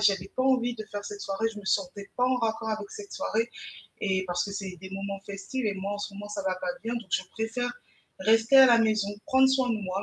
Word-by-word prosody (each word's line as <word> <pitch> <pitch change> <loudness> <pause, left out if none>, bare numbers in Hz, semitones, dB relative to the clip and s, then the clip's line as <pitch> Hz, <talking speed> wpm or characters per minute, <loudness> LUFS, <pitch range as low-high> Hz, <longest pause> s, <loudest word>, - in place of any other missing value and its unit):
j'avais 195 -2 +3
pas 255 - +1
envie 245 -2 +3
de 215 -2 -6
faire 205 -1 -6
cette 205 0 -6
soirée. 210 +3 -1
Je 210 - -9
me 190 - -14
sentais 195 +1 -1
pas 250 - +3
en 255 0 +3
raccord 225 -1 -1
avec 215 -2 -3
cette 205 -1 -9
soirée. 230 +2 -1 0.5
Et 190 -2 +1
parce 175 0 0
que 200 - -6
c'est 195 -2 -5
des 190 - -8
moments 195 0 -4
festives 200 +5 -3
et 205 - 0
moi 195 +1 -3
en 205 - -3
ce 205 -1 -5
moment 205 +1 -7
ça 205 -1 -4
va 185 -1 +1
pas 180 - -4
bien 230 +1 -2
donc 230 -6 -6
je - - +2
préfère, 225 +2 -2 0.5
rester 225 +5 +5
à 265 - +11
la 235 -2 +6
maison, 215 -2 +2 0.2
prendre 265 0 +6
soin 265 -2 +2
de 225 - +1
moi 190 +1 -2
210 Hz, 255 wpm, -28 LUFS, 195-230 Hz, 0.5 s, à